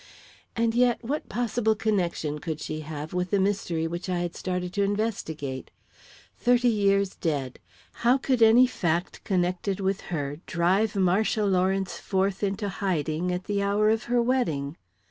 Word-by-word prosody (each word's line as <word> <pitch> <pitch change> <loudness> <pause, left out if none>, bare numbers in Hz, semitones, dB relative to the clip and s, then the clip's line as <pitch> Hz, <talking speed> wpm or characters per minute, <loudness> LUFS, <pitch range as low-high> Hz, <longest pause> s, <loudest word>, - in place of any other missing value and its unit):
And 230 0 +1
yet, 245 0 +2
what 285 +6 -3
possible 220 0 0
connection 175 -8 -1
could 160 -1 -4
she 155 0 -4
have 155 0 -6
with 180 0 -1
the 200 - +2
mystery 190 -4 0
which 170 +3 -4
I 180 - 0
had 175 -1 -3
started 180 -1 -3
to 200 - 0
investigate? 195 -10 -2 0.7
Thirty 245 0 +3
years 200 -3 +2
dead 140 -6 -2 0.4
how 245 +3 +5
could 260 -3 0
any 225 +3 +7
fact 175 -7 -2
connected 185 +1 0
with 195 0 -1
her 145 -3 -3
drive 190 +5 +1
Marcia 200 +3 +2
Lawrence 190 0 +1
forth 195 0 -1
into 200 +1 -1
hiding 180 -3 -1
at 180 +1 -2
the 200 0 -1
hour 205 +2 +3
of 220 0 0
her 240 0 +2
wedding? 165 - 0
195 Hz, 155 wpm, -26 LUFS, 170-220 Hz, 0.7 s, any